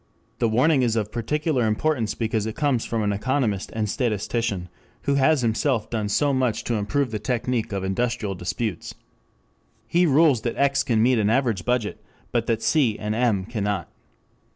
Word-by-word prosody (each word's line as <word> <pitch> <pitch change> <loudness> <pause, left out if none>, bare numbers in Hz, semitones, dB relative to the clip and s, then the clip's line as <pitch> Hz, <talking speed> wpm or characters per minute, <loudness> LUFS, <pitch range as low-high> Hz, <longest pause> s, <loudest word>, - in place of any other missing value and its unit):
The 115 - +2
warning 130 +6 +3
is 115 -3 +1
of 105 -2 -1
particular 130 +1 0
importance 115 +1 0
because 110 -2 -1
it 110 - -5
comes 140 -6 0
from 115 -2 -1
an 105 0 +1
economist 110 -2 -1
and 110 -1 0
statistician 105 -4 -1 0.4
who 140 - +1
has 140 0 +3
himself 115 +1 0
done 110 -3 -1
so 145 +7 +2
much 130 -4 0
to 120 - -2
improve 110 +5 0
the 110 - -3
technic 120 0 -1
of 100 -1 -2
industrial 105 +1 -1
disputes.] 95 +4 -4 0.9
He 175 +9 +2
rules 145 -4 +4
that 120 0 -3
X 140 0 +3
can 115 -4 +2
meet 125 -1 +3
an 105 -1 +2
average 115 -6 +1
budget, 120 -4 -1 0.3
but 115 -1 0
that 115 -1 0
C 130 -9 +2
and 105 0 -3
M 110 -5 +1
cannot. 105 -4 -3
115 Hz, 175 wpm, -24 LUFS, 105-130 Hz, 0.9 s, rules